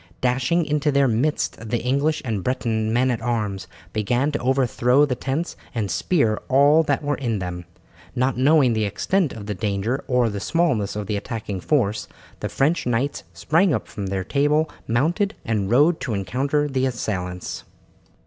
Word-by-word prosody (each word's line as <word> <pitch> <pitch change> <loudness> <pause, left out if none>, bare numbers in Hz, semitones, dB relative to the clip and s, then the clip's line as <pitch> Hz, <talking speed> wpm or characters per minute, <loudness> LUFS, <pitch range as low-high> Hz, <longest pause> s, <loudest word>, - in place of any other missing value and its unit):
Dashing 130 +7 +1
into 150 0 +1
their 140 -1 +3
midst 115 -2 -1
the 120 - +1
English 140 +5 +1
and 110 -6 -2
Breton 115 -4 -1
men 125 +3 +2
at 115 - -2
arms 105 -5 -2 0.3
began 120 +7 +1
to 145 - -2
overthrow 130 +1 +3
the 140 - -1
tents 135 +7 -3 0.2
and 105 -5 -1
spear 115 -12 +1
all 145 +4 +5
that 145 -2 0
were 145 -1 0
in 120 -5 -1
them. 90 -2 -5 0.5
Not 130 +1 +1
knowing 135 -1 +4
the 110 -1 0
extent 165 - 0
of 105 -3 -8
the 105 - -3
danger 105 +6 -2
or 125 -3 +2
the 100 - -4
smallness 120 - 0
of 105 -1 -3
the 105 0 -2
attacking 105 -2 -5
force, 110 - 0 0.3
the - - -3
French 150 +1 +1
knights 125 +4 0
sprang 165 0 +2
up - - -4
from 100 -3 -5 0.2
table, 150 +7 +1 0.2
mounted, 170 - +1
and 105 -4 -1
rode 150 +8 +4
to 115 -6 -2
encounter 140 +9 0
the 130 -2 0
assailants. 90 -7 -4
125 Hz, 170 wpm, -23 LUFS, 110-145 Hz, 0.5 s, all